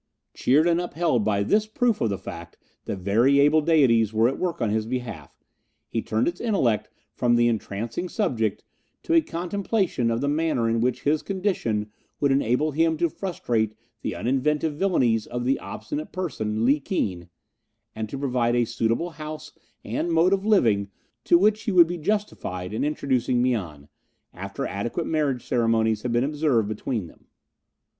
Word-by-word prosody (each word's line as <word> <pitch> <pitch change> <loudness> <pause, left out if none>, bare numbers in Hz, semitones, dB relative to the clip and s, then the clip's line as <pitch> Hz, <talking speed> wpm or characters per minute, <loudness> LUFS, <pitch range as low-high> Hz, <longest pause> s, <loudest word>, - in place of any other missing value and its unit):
Cheered 145 +5 +3
and 170 0 +2
upheld 165 -9 0
by 100 -1 +1
this 210 - +2
proof 230 +1 0
of 115 - +2
the 100 - -2
fact - - -9 0.3
that - - -3
very 115 +9 +3
able 150 +2 +5
deities 130 -9 +3
were 110 +1 +3
at 135 - -2
work 180 -3 -2
on 110 - 0
his 110 0 -1
behalf, 115 - -5 0.5
he 115 - -1
turned 110 +2 0
his 175 - -2
intellect 165 - +1 0.2
from 120 -1 +2
the 120 0 +4
entrancing 115 - -3
subject 120 - -1 0.4
to 330 - -1
a 330 - +6
contemplation 180 - -1
of 115 0 0
the 140 - -1
manner 150 -5 +1
in 115 0 +1
which 125 0 0
his 150 +1 +2
condition 175 - -2 0.3
would 140 -1 +2
enable 135 +3 +1
him 160 +2 +1
to 170 0 +1
frustrate 115 - -2 0.3
the - - -3
uninventive 150 +5 0
villainies 130 - +1
of 120 0 -4
the 135 +2 +1
obstinate 300 +1 -6
person 110 -12 -2
Li 140 +4 +4
Keen, 90 - -3 0.7
and 110 -1 -4
to 135 - -5
provide 125 -3 0
a 120 -1 +3
suitable 120 +8 -1
house 155 0 -8 0.3
and 170 +1 -2
mode 165 +3 +4
of 195 -1 0
living 115 - +3 0.4
to 170 - +6
which 210 +4 +3
he 215 - 0
would 175 -3 +7
be 175 +1 -5
justified 130 - -3
in 110 - -1
introducing 130 -4 0
Mian, 90 - -1 0.5
after 95 +2 -5
adequate 120 +11 -3
marriage 145 -6 -1
ceremonies 115 -2 +1
had 125 - -3
been 120 +1 +2
observed 145 -6 +1
between 110 0 -3
them. 80 - -17
130 Hz, 170 wpm, -25 LUFS, 110-165 Hz, 0.7 s, would